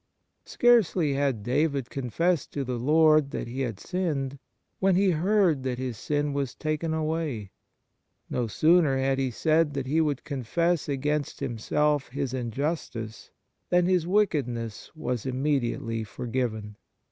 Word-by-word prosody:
Scarcely 195 -11 +3
had 135 -6 0
David 140 +1 0
con 130 -3 -4
fessed 170 +3 0
to 140 - -2
the 125 -2 -3
Lord 155 +2 +4
that - - -4
he 125 +3 -4
had 115 -6 -3
sinned, 145 -7 -2 0.4
when 190 -1 +3
he 190 0 +4
heard 180 -2 +2
that 130 -1 -2
his 130 -2 -3
sin 145 +5 -1
was 140 -3 -2
taken 155 +1 -2
away; 155 - -2 0.8
no 120 -2 -1
sooner 155 - +4
had 135 0 +1
he 135 -1 +1
said 155 +4 +1
that 135 -2 -2
he 155 +5 +2
would 145 -4 -1
confess 155 +5 -1
against 145 +1 -1
himself 145 +5 0
his 135 0 -3
injustice, 120 -2 -4 0.4
than 180 0 +4
his 180 -2 +2
wickedness 140 - 0
was 125 -5 -3
immediately 130 -4 -1
forgiven. 110 -2 -4
140 Hz, 140 wpm, -27 LUFS, 125-160 Hz, 0.8 s, Lord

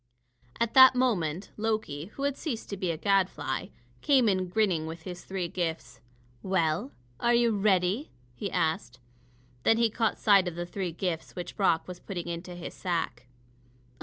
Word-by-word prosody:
At 230 -1 0
that 260 -1 +9
moment 195 -8 0
Loki, 215 -9 -2
who 275 - -5
had 280 -1 +1
ceased 250 -11 -5
to - - -2
be 185 -2 -2
a 165 - -1
gadfly, 195 0 0 0.3
came 265 -5 +4
in 185 -2 +1
grinning, 180 -5 +1
with 160 0 -7
his 180 0 -7
three 190 -2 -3
gifts. 170 -2 -4 0.4
"Well, 185 - 0 0.3
are 235 0 +3
you 235 -1 +4
ready?" 195 - +2 0.2
he 195 +11 -4
asked. 125 -8 -1 0.6
Then 225 - +4
he 230 -1 +3
caught 225 0 0
sight 200 -4 +5
of 175 - -4
the 175 0 -3
three 180 0 -4
gifts 170 -1 -4
which 180 - -6
Brock 190 -5 +2
was 180 -1 -8
putting 175 -4 -6
into 170 +1 -5
his 175 - -7
sack. 165 -9 -3
185 Hz, 165 wpm, -28 LUFS, 170-220 Hz, 0.6 s, that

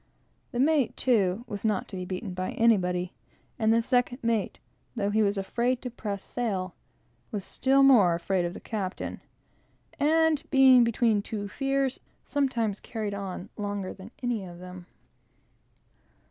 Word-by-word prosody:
The 245 - -3
mate, 285 -2 +2
too, 215 -3 +1
was 205 -3 -6
not 215 -4 0
to 195 - -7
be 180 -1 -4
beaten 185 +1 -5
by 185 +1 -3
anybody; 180 -6 +2 0.5
and 220 -1 +3
the 230 0 +3
second 245 +1 +1
mate, 230 -3 0 0.4
though 205 -3 0
he 220 +1 +2
was 205 -1 +1
afraid 235 +6 0
to 250 - -4
press 205 -4 -5
sail, 195 -7 -3 0.6
was 205 -4 -3
afraid 270 +7 +1
as 180 -11 +5
death 190 -2 +2
of 175 - -3
the - - -7
captain, 195 -4 -4 0.8
and 320 0 +3
being 265 -3 +7
between 230 -2 +2
two 205 0 -5
fears, 270 +4 -1 0.2
sometimes 235 -8 -1
carried 215 -3 -4
on 195 -1 -5
longer 205 -2 -3
than 190 +2 -11
any 240 -4 -1
of 175 -2 -9
them. 180 0 -10
215 Hz, 150 wpm, -27 LUFS, 190-245 Hz, 0.8 s, being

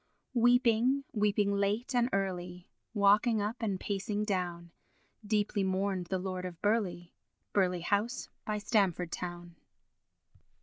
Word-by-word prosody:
Weeping, 245 +2 +4
weeping 205 -1 +2
late 205 +6 0
and 245 0 +2
early, 180 -2 -3 0.2
Walking 210 +3 +4
up 210 +4 -2
and 200 -5 -1
pacing 205 +1 -2
down, 175 -4 -2 0.5
Deeply 205 -1 0
mourned 190 -1 -1
the 190 - -1
Lord 185 0 -4
of 180 -2 -6
Burleigh, 200 -5 0 0.4
Burleigh 180 -3 +1
house 210 +7 0 0.2
by 215 -3 -2
Stamford 195 -6 +1
town. 175 -1 -6
200 Hz, 120 wpm, -31 LUFS, 180-215 Hz, 0.5 s, Weeping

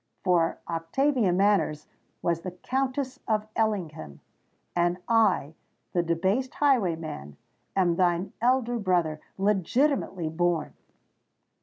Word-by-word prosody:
For 175 -3 +2
Octavia 200 - +1
Manners 185 -5 +2 0.4
was 170 -1 0
the 185 - -4
Countess 260 +7 -2
of 215 -1 +1
Ellingham—and 175 - -3
I—the 185 -6 0
debased 190 +10 0
highwayman, 165 - 0 0.4
am 180 -3 +3
thine 175 0 +1
elder 245 -1 +2
brother, 175 -6 0 0.2
legitimately 200 - +1
born!" 170 +1 0
185 Hz, 90 wpm, -27 LUFS, 165-230 Hz, 0.4 s, am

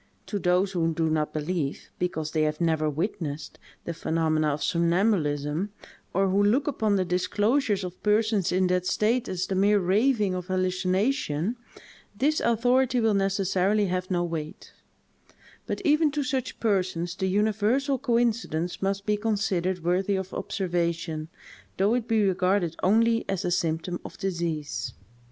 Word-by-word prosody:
To 205 - -3
those 180 +1 +2
who 165 -3 0
do 160 -1 +1
not 155 -1 0
believe, 155 -2 -3
because 160 -4 -2
they 155 - 0
have 155 0 0
never 160 -2 +1
witnessed, 150 -2 -4 0.3
the 170 - -3
phenomena 160 -1 0
of 145 0 -1
somnambulism, 170 -2 +1 0.4
or 195 +2 +2
who 195 +2 +2
look 240 +8 +3
upon 220 -7 +1
the 190 -1 +1
disclosures 205 +5 +1
of 180 0 -7
persons 210 -2 +2
in 185 +1 +2
that 180 0 +1
state 230 +3 +1
as 185 0 -2
the - - -3
mere 200 +2 +4
raving 205 +2 +2
of 180 -1 -4
hallucination, 185 - 0 0.6
this 300 +6 +2
authority 245 +2 +2
will 225 -2 +2
necessarily 195 +1 +1
have 185 0 -2
no 175 -2 +1
weight; 160 -3 -6 0.9
but - - -2
even 305 0 +4
to 295 0 0
such 260 -1 -3
persons 185 -5 0
the 190 +1 -2
universal 220 +7 +1
coincidence 230 - 0
must 195 +1 -1
be 210 -1 +1
considered 195 -5 -1
worthy 185 +3 +1
of 190 -1 -4
observation, 170 -4 -2 0.5
though 200 +4 +3
it 245 -1 -1
be 225 -2 +2
regarded 185 -2 +1
only 230 +4 +3
as 195 -2 -1
a 175 - 0
symptom 170 +1 -1
of - - -10
disease. 165 - -3
185 Hz, 150 wpm, -26 LUFS, 170-215 Hz, 0.9 s, mere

